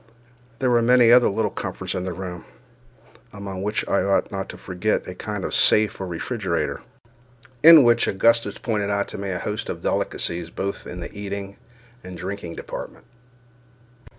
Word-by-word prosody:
There 130 -1 +1
were 120 -1 +4
many 120 0 +5
other 125 0 +6
little 110 +2 -1
comforts - - -5
in 90 - -3
the 95 - -3
room, 90 -1 -6 0.9
among 100 -2 -7
which 105 +2 -2
I 100 - +2
ought 100 0 +1
not 95 -1 -4
to - - -8
forget 95 +3 -2
a - - -5
kind - - -5
of - - -4
safe 105 -2 +3
or 95 - -3
refrigerator, 90 0 -2 0.8
in 160 -2 +10
which 120 -1 +4
Augustus 115 +4 +2
pointed 105 -4 -2
out 100 0 0
to - - -7
me 100 0 -4
a 90 - -2
host 105 +4 -4
of - - -5
delicacies, 85 -1 -2
both 100 +3 -5
in 90 - -7
the 85 - -7
eating 100 -1 -6 0.5
and 90 -1 -9
drinking 90 -1 -6
department. - - -8
100 Hz, 170 wpm, -23 LUFS, 95-115 Hz, 0.9 s, in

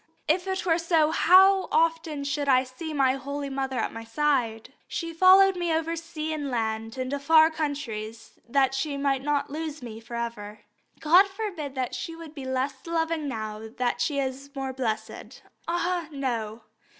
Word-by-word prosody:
If 365 +1 +1
it 380 -1 -2
were 335 -1 +3
so, 330 -2 +2
how 380 +3 +6
often 325 -2 +1
should 280 0 -1
I 255 -1 +5
see 265 +5 -7
my 270 -3 +3
holy 280 +1 -5
mother 265 -1 -2
at 225 - -1
my 225 - -7
side! 230 -3 -1
She 335 -1 -4
followed 375 +3 +6
me 350 -2 -1
over 325 +1 0
sea 320 -1 -5
and 290 -2 -3
land 225 -1 -2
into 260 +2 -2
far 315 +2 +5
countries 235 -8 -5
that 270 +1 +3
she 280 +1 -2
might 275 -1 0
not 290 0 -1
lose 310 -2 -5
me 225 -2 -7
for 235 +1 -9
ever. 215 -3 -5 0.4
God 355 +6 +6
forbid 385 -9 -5
that 255 -2 -2
she 330 - -5
should 330 -2 -10
be 275 -4 -8
less 260 +1 -1
loving 325 -2 -1
now 215 -4 -5 0.2
that 245 -1 0
she 280 +4 0
is 275 0 -3
more 270 -1 -3
blessed. 235 -4 -4 0.2
Ah, 345 0 -1
no! 235 -6 -3
280 Hz, 175 wpm, -26 LUFS, 255-325 Hz, 0.4 s, how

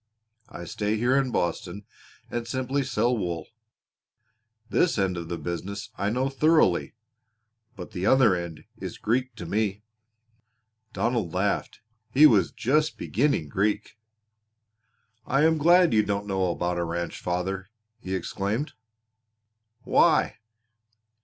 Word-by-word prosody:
I 85 - -8
stay 105 +4 -1
here 120 +4 +2
in 135 -2 +2
Boston 90 0 -2 0.5
and 120 -1 -3
simply 130 +2 -1
sell 125 -2 +1
wool. 85 -6 -3 1.2
This 165 +5 +2
end 95 -2 +1
of 85 -1 -6
the 85 - -3
business 95 +5 -5
I 100 +2 -1
know 125 +4 0
thoroughly, 140 - +2 0.8
but 90 -4 -9
the 95 +2 -2
other 125 -7 +5
end 85 -3 -6 0.2
is - - -6
Greek 125 +2 -1
to 85 - -7
me." 105 +2 -1 1.1
Donald 110 -4 -1
laughed. 100 +2 -1 0.3
He 140 +6 +6
was 100 - +5
just 150 +5 +1
beginning 130 - 0
Greek. 105 +7 -1 1.3
"I 135 +3 +2
am 160 0 +3
glad 175 +1 +5
you 110 - +5
don't 100 -1 -2
know 95 -2 0
about 90 0 -1
a - - 0
ranch, 85 0 -4
father," 95 +2 -3 0.3
he 95 -3 -4
exclaimed. 100 - -2 1.1
"Why?" - - +3
105 Hz, 125 wpm, -26 LUFS, 90-130 Hz, 1.3 s, He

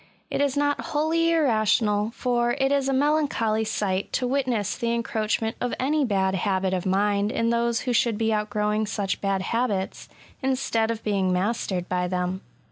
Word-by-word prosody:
It - - 0
is 285 -1 +1
not 290 0 +1
wholly 320 +3 0
irra 295 -10 +3
tional; 210 0 +2
for 240 -1 0
it 270 0 +2
is 275 -1 +1
a - - +2
melancholy 270 -6 +1
sight 200 -3 -2
to 255 - 0
witness 245 -6 0
the 235 0 -1
encroachment 220 -1 -1
of 245 - -1
any 290 +2 +1
bad 190 -4 +1
habit 190 0 0
of 185 0 -1
mind 200 +2 +1
in 230 0 0
those 235 0 +1
who 250 - -1
should 230 -2 +2
be 225 0 +1
outgrowing 210 0 0
such 200 -1 -2
bad 195 -1 0
habits, 210 -4 -2 0.3
instead 255 -4 0
of 225 -1 -3
being 195 -3 +1
mastered 185 -1 -1
by 180 -1 -1
them. 180 +1 -2
220 Hz, 175 wpm, -25 LUFS, 200-255 Hz, 0.3 s, irra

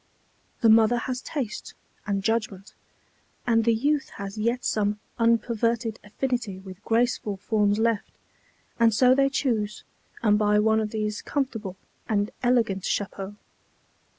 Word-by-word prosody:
The 230 - +5
mother 225 +2 +6
has 250 +1 -3
taste 260 -9 -5 0.3
and 200 -1 -1
judgment, 215 -3 -2 0.7
and 225 -2 +3
the 230 - +4
youth 285 +4 0
has 200 0 -6
yet 235 +3 -1
some 210 -1 0 0.2
unperverted 230 0 +1
affinity 225 -1 -3
with 190 +1 -11
graceful 225 -3 0
forms 205 +1 +1
left, 225 -1 0 0.7
and 225 -2 +4
so 255 +2 +6
they 275 +1 +3
choose 220 -7 -1 0.4
and 210 -2 +4
buy 210 0 +3
one 220 +1 +3
of 215 -1 -1
these 210 -1 -3
comfortable 225 -9 -3 0.3
and 205 -1 +1
elegant 230 -6 +2
chapeaux. 195 0 -3
220 Hz, 130 wpm, -26 LUFS, 205-235 Hz, 0.7 s, mother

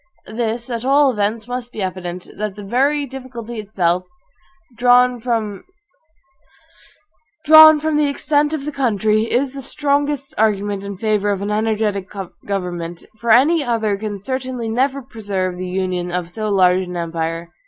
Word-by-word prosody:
This, 235 +1 -2
at 230 0 -3
all 275 +1 +4
events, 215 0 -2
must 245 0 -5
be 210 - -4
evident, 180 -1 -5
that 210 -1 -4
the 205 - -9
very 275 +7 +1
difficulty 245 -3 -8
itself, 180 -4 0 0.7
drawn 245 +1 +4
from 220 -4 -2 1.9
the 315 -1 +7
extent 295 +1 +2
of 305 -3 -3
the 300 - -3
country, 220 -5 +1
is 260 +2 +1
the 275 - -6
strongest 285 0 -1
argument 205 -2 +1
in 200 -1 -6
favor 210 -1 0
of 200 -1 -1
an 205 - -2
energetic 210 -2 -1 0.4
government; 175 -3 -4
for 235 - -4
any 290 +8 +5
other 225 -5 0
can 205 0 -5
certainly 255 +1 -4
never 265 +4 0
preserve 200 -7 -3
the 185 0 -4
Union 180 -1 -2
of 175 -1 -3
so 215 +3 -3
large 185 -2 +3
an 180 0 -5
empire. 165 0 -3
220 Hz, 145 wpm, -19 LUFS, 195-260 Hz, 1.9 s, the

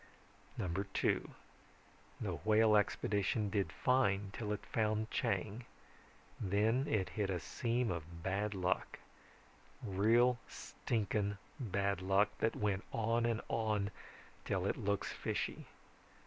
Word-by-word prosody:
(2) - - +1 0.9
The - - -2
Whale 110 0 +5
expedition 105 0 +1
did 100 -2 0
fine 105 -6 +2
till 105 -1 -3
it 105 - -3
found 110 0 0
Chang. 105 +5 -1 0.7
Then 110 +7 +2
it 95 -4 +1
hit 105 -2 -1
a 90 -2 0
seam 120 - -1
of 85 0 -6
bad 100 +2 -1
luck. 90 -1 -1 0.9
Real 115 +4 +4
stinking 105 -2 -2 0.2
bad 100 -5 0
luck 100 +2 +3
that 110 - +1
went 105 -1 0
on 115 +1 +1
and 115 -1 0
on 105 -3 0 0.5
till - - -1
it - - +1
looks 100 -1 -1
fishy. - - -3
105 Hz, 115 wpm, -36 LUFS, 100-110 Hz, 0.9 s, Whale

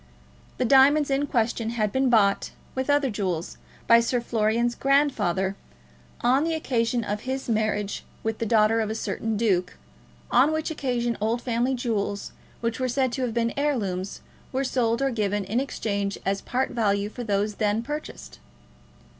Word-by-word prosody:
The 255 - +1
diamonds 280 +3 +5
in 280 +2 +1
question 230 -3 0
had 215 -3 -1
been 265 +2 +2
bought, 200 -4 +3 0.2
with 260 +1 -3
other 285 -3 +3
jewels, 185 -5 -3 0.3
by 230 0 +7
Sir 240 +1 +1
Florian's 235 +1 +1
grandfather, 245 -10 +1 0.7
on 255 +4 +3
the 325 0 0
occasion 240 -5 0
of 210 0 -3
his 265 +1 -4
marriage 215 -2 -1 0.2
with 220 -1 -2
the 230 - -1
daughter 225 0 +4
of 215 - -2
a 220 - -2
certain 225 -1 -2
duke, 195 -5 0 0.5
on 270 +5 +5
which 315 +1 -1
occasion 245 -6 -1
old 225 +3 +1
family 245 +2 0
jewels, 210 -5 -2 0.3
which 230 0 -2
were 255 0 0
said 260 0 +1
to 260 - -3
have 240 -3 -2
been 230 0 +1
heirlooms, 200 -10 -2 0.3
were 265 +1 0
sold 245 -1 0
or 270 - +1
given 205 -3 -1
in 220 +6 0
exchange 200 -7 -2
as 195 0 0
part 260 +2 -1
value 200 -3 +1
for 240 +3 -7
those 205 -1 -1
then 210 +2 +1
purchased. 295 +4 -7
230 Hz, 165 wpm, -25 LUFS, 210-260 Hz, 0.7 s, by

